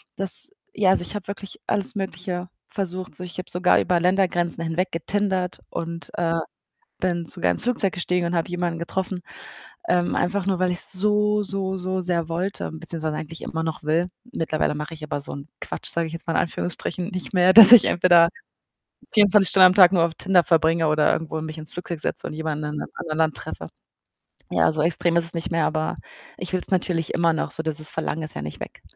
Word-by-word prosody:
Das 195 - -1 0.2
ja, 190 - +3
also - - +2
ich 210 - -7
habe 205 -2 -6
wirklich 200 -1 -8
alles 210 +4 0
Mögliche 180 -1 -4 0.2
versucht. 185 -3 -4
So, 180 - -6
ich 175 0 -9
habe 185 - -7
sogar 180 +1 +3
über 175 -1 +1
Ländergrenzen 175 -2 +1
hinweg 180 +3 -2
getindert 185 +1 -2
und, 170 0 -6
äh, 170 -1 0 0.7
bin 175 -2 -1
sogar 90 - 0
ins - - -4
Flugzeug 235 -6 0
gestiegen 180 0 -1
und 170 - -2
habe 165 - -1
jemanden 175 -1 -3
getroffen, 185 +2 -4 0.7
ähm, 175 0 +1
einfach 195 +1 -1
nur, 190 - +1
weil 185 -1 +1
ich's 175 - +3
so, 210 +2 +2
so, 190 -1 -3
so 185 +1 -3
sehr 170 -2 -2
wollte. 180 +4 -3
beziehungsweise 160 -1 -4
eigentlich 160 +1 -8
immer 160 - -4
noch 160 -1 -5
will. 165 +4 0 0.2
Mittlerweile 160 -2 -1
mache 150 +2 -6
ich 155 - -13
aber 145 -1 -3
so 140 - -7
'n 140 +2 -9
Quatsch, - - -6
sage 170 -1 -1
ich 160 - -10
jetzt 165 - -7
mal 165 - -1
in - - +2
Anführungsstrichen, 175 +1 -3
nicht 185 -3 -6
mehr, 180 +1 +4
dass 225 0 +12
ich 240 - +9
entweder 175 -1 +5 0.9
24 205 -2 +5
Stunden 185 -1 +7
am 180 - 0
Tag 185 -2 +7
nur 170 -3 +3
auf 165 -1 -2
Tinder 185 -2 +2
verbringe 165 -1 +2
oder 150 0 +2
irgendwo 160 0 -3
mich 155 0 -7
ins 155 - -10
Flugzeug 170 -2 -6
setze - - -2
und - - -6
jemanden 155 -1 -4
in 150 - -5
'nem - - -5
anderen 155 -1 -5
Land 155 -4 +1
treffe. - - -7 0.8
Ja, - - +3
so 155 -1 -2
extrem 170 0 +2
ist 170 - +1
es 170 - +4
nicht 165 +1 -4
mehr, 165 -2 +1
aber 155 0 -2 0.4
ich 180 +1 -7
will's 185 - 0
natürlich 175 -3 -1
immer 170 -1 +2
noch, 160 - -2
so, 160 - -2
dieses 155 -1 0
Verlangen 160 0 -4
ist 155 - -7
ja - - -5
nicht 75 - -8
weg. - - -9
175 Hz, 210 wpm, -23 LUFS, 160-185 Hz, 0.9 s, dass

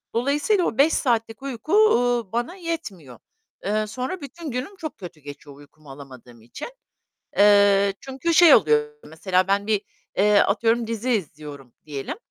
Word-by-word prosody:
Dolayısıyla 295 - +1
o 225 - -3
5 300 +4 +4
saatlik 225 -3 -1
uyku, 275 - -5
uuu, 245 - +3
bana 240 +9 -2
yetmiyor. 220 - -7 0.5
Eee, 215 +1 -1
sonra 260 - -5
bütün 295 +1 -8
günüm 255 +11 -5
çok 315 -4 -7
kötü 180 -6 -11
geçiyor 145 0 -12
uykumu 145 0 -17
alamadığım 130 -4 -14
için. 120 - -9 0.7
Eee, 200 -1 +5
çünkü 270 +5 -3
şey 330 -2 +7
oluyor, 150 -6 +2
mesela 180 +4 -1
ben 200 +1 0
bir 210 -2 +1 0.6
atıyorum, 225 +3 +1
eee, 225 - -5
dizi 230 +2 -3
izliyorum 145 - -5
diyelim, 145 - -6
215 Hz, 145 wpm, -23 LUFS, -, 0.7 s, şey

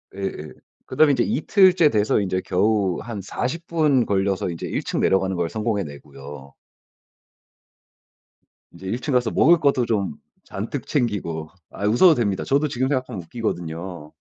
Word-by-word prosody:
예예. 95 -6 -5 0.3
그다음에 150 +3 +4
인제 125 -4 +2
이틀째 180 0 +4
돼서 110 -4 +1
인제 95 -2 -1
겨우 100 -1 +1
한 115 -4 -6
40 140 - -4
분 150 -7 +2
걸려서 95 -1 0
이제 85 -2 -5
1 - - -2
층 - - -3
내려가는 95 0 +1
걸 85 -1 -1
성공해내고요. 70 - -5 2.2
인제 85 +2 -12
1 115 +6 -2
층 145 - -2
가서 125 -2 +2
먹을 170 +2 +5
것도 140 -5 +2
좀 100 -9 -1 0.3
잔뜩 115 +7 -5
챙기고 95 - -2 0.2
아 100 - -5
웃어도 155 - +5
됩니다. 100 -6 -1
저도 145 +3 +1
지금 130 -1 -1
생각하면 130 -7 -2
웃기거든요. 85 -5 -5
105 Hz, 300 characters per minute, -22 LUFS, 90-130 Hz, 2.2 s, 먹을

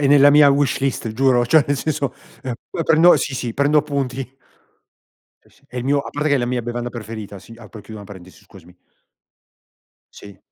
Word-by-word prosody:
è 140 - +2
nella 145 0 +6
mia 145 -1 +6
wishlist 135 -4 0
giuro, 125 0 +2
cioè 155 +4 +4
nel 145 - 0
senso, 145 -2 -2 0.3
uh, 130 - -3 0.2
uh, 165 - -3
prendo 165 +2 +5
sì, 140 - -3
sì 120 -3 -4
prendo 145 +3 +2
appunti. 135 -3 -3 1.1
Sì, - - -27
sì, - - -28
è 125 - -12
il 125 - -3
mio 140 +2 +2
a 140 - -5
parte 150 +1 -2
che - - +4
è - - -1
la 120 - -1
mia 125 -1 -2
bevanda 120 +1 -4
preferita, 110 -3 -8
sì, 115 - -14
apro 110 -1 -13
e - - -18
chiudo 110 +2 -11
una 100 - -12
parentesi, 95 -2 -14
scusami. 90 -2 -17 1.4
Sì. 100 -2 -14
130 Hz, 205 wpm, -20 LUFS, 115-145 Hz, 1.4 s, nella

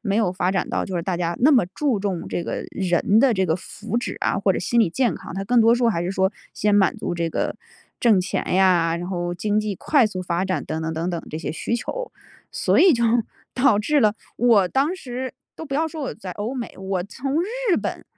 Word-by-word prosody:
没 200 -3 0
有 215 -5 +2
发 185 0 0
展 190 - -1
到 - - -1
就 190 - -4
是 170 - -1
大 180 0 -2
家 170 -1 -2
那 290 +5 +6
么 245 -9 +5
注 215 +4 -1
重 190 -4 -3
这 175 - -2
个 - - -4
人 190 +3 +2
的 265 -1 +4
这 190 -3 +1
个 160 - +2
福 210 +5 -6
祉 240 - -2
啊， - - 0
或 195 0 +2
者 - - -2
心 235 +6 +1
理 205 -7 +3
健 245 +6 +1
康， - - -9
它 195 +3 -4
更 240 +3 +3
多 225 +1 +6
说 240 -1 +2
还 170 -7 0
是 175 - -2
说 190 0 +1 0.2
先 210 0 +1
满 195 -2 +3
足 - - -3
这 170 -1 -2
个 - - -1 0.5
挣 220 -6 +4
钱 185 - -2
呀， 175 -3 +3
然 175 +1 -5
后 175 -2 -2
经 210 +4 0
济 210 -2 -3
快 285 - +3
速 185 -3 -5
发 180 0 -1
展 185 -6 -2
等 160 +1 -4
等 160 0 -2
等 165 +2 -2
等 170 -2 -3
这 155 - -4
些 160 - -4
需 230 +8 -2
求。 - - -5 0.4
所 - - +2
以 370 -2 +7
就 235 -3 +1 0.5
导 255 -5 +4
致 290 +8 +2
了 210 -3 +3 0.2
我 230 -6 +4
当 280 - +1
时 255 -4 -5 0.2
都 - - -8
不 275 -3 -5
要 320 +2 +1
说 315 -1 -6
我 270 - -4
在 190 -5 -7
欧 210 +6 -4
美， 250 -3 -5
我 190 -1 -2
从 270 - -2
日 455 +1 0
本 - - -4
205 Hz, 265 characters per minute, -23 LUFS, 180-245 Hz, 0.5 s, 以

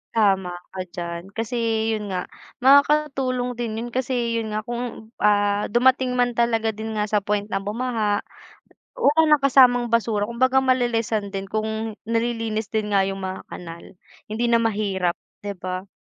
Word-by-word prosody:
Tama 195 -4 +2 0.2
ka 190 - -8
diyan. 170 -2 -6
Kasi 225 +2 -3 0.4
'yun 215 -1 -2
nga 180 -1 -3 0.4
makakatulong 270 -3 +3
din 230 -2 -2
'yun 235 +2 -4
kasi 240 -2 -1
yun 220 -1 -4
nga 215 - -2
kung, 240 -1 -6
ah, 205 0 +2
dumating 255 +2 +3
man 245 0 +2
talaga 225 -1 +1
din 220 +1 -6
nga 210 0 0
sa 210 - +3
point 205 0 -1
ng 195 0 -2
bumaha 215 -2 -1 0.7
wala 320 -10 +3
ng 300 -2 +4
kasamang 250 -3 +5
basura, 225 -3 +1
kung 235 - -7
baga 260 +2 +4
mali-lessan 230 -5 0
din 195 0 -4
kung 220 +1 -3
nalilinis 225 -1 -1
din 215 -2 -2
nga 200 - +4
'yung 195 0 -4
mga 190 0 -4
kanal 170 -1 -9 0.4
hindi 220 +3 -2
na 230 - +5
mahirap 200 -5 0 0.2
'di 200 -1 -5
ba? 185 +1 -5
225 Hz, 160 wpm, -23 LUFS, 205-245 Hz, 0.7 s, kasamang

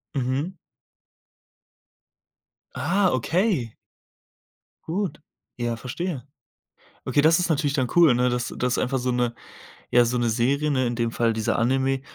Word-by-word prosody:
Mhm. 135 +7 -1 2.2
Ah, 190 +5 +2
okay. 150 - 0 1.1
Gut. 190 +3 -2 0.4
Ja, 120 -1 -2
verstehe. 135 +5 -4 0.8
Okay, 145 - +2
das 160 +3 +5
ist 180 - 0
natürlich 150 -3 +1
dann 130 -4 0
cool, 165 -7 +7
ne? 125 +1 +2
Dass 125 0 -2
dass 125 0 0
einfach 130 +1 0
so 125 0 -1
'ne 120 -1 0 0.6
ja, 120 - +5
so 120 +1 0
'ne 120 -1 +1
Serie, 135 +6 +1
ne, 130 -3 +1
in 120 0 -1
dem 115 -1 -1
Fall 115 0 +1
dieser 110 -1 -1
Anime, 135 +2 +1
130 Hz, 140 wpm, -24 LUFS, 120-155 Hz, 2.2 s, cool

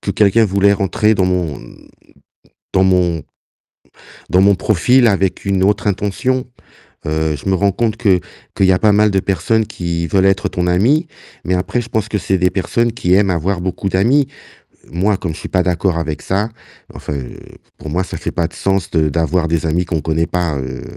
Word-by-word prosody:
que - - -3
quelqu'un 105 +3 +3
voulait 100 0 +3
rentrer 105 +2 +1
dans 95 -1 +1
mon 90 -7 -2 1.1
dans 95 - +4
mon 90 -3 +2 1.1
dans 90 - +4
mon 100 +1 +5
profil 120 +7 +3
avec 95 -3 0
une 100 -2 0
autre 105 +3 +1
intention. 105 +7 -1 0.6
Heu, 80 0 0
je 75 - -6
me 95 - +2
rends 100 +1 +2
compte 115 +2 -1
que 100 -6 +2 0.4
qu'il 95 - +3
y 95 - +5
a 90 - +2
pas 105 +1 +3
mal 105 +1 +4
de 95 - +1
personnes 100 +4 0
qui 85 -3 -3
veulent 95 +3 +2
être 95 -1 +1
ton 90 0 -2
ami, 125 - +2 0.4
mais 90 - 0
après 90 +7 -1
je 120 - -8
pense 110 -2 -2
que 105 - -1
c'est 95 0 0
des 90 0 +2
personnes 115 +5 0
qui 90 -6 -1
aiment 100 0 +3
avoir 90 +2 -1
beaucoup 95 +2 -3
d'amis. 120 +10 +2 0.6
Moi, 95 +5 +1
comme 85 -4 -4
je - - -10
suis - - -7
pas 95 - +1
d'accord 90 -1 0
avec 75 -2 -3
ça, 100 +3 -1 0.5
enfin, - - -6
heu, 65 -3 -7 0.4
pour 75 - -7
moi, 90 +4 0
ça - - -7
fait - - -5
pas 85 -1 -1
de 85 - -18
sens 95 0 -1
de 80 -2 +1
d'avoir 80 +3 0
des 85 0 -1
amis 85 +3 0
qu'on 85 -3 -2
connaît 80 +1 0
pas, 85 -5 -1
heu 65 -1 -6
95 Hz, 205 wpm, -17 LUFS, 85-105 Hz, 1.1 s, mon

